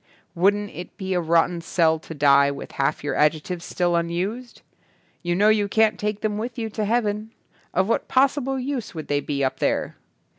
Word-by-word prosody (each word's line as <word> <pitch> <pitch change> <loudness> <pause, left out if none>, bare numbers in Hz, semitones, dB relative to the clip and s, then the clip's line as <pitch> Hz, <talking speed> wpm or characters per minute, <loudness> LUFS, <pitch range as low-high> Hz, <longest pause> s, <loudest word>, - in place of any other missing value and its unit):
Wouldn't 205 +3 +2
it 175 - -9
be 190 -1 -3
a 180 - +1
rot 165 0 +3
ten 175 -1 -5
sell 160 -1 +2
to 160 - -10
die 140 -1 +5
with 140 -1 -7
half 135 0 -1
your 145 - -1
adjec 150 +1 +2
tives 180 -2 -5
still 175 -1 0
unused? 185 +9 -3 0.6
You 175 -1 -1
know 205 +3 +4
you 210 -1 +3
can't 215 -1 +2
take 210 0 -2
them 210 -1 -1
with 235 +2 -5
you 225 -2 -3
to 215 0 -2
heaven. 215 -1 -1 0.4
Of 185 +1 +1
what 230 - 0
possible 270 0 +2
use 255 -6 -4
would 155 - -7
they 145 0 +2
be 140 -1 -2
up 130 - -1
there? - - -1
190 Hz, 200 wpm, -23 LUFS, 165-215 Hz, 0.6 s, die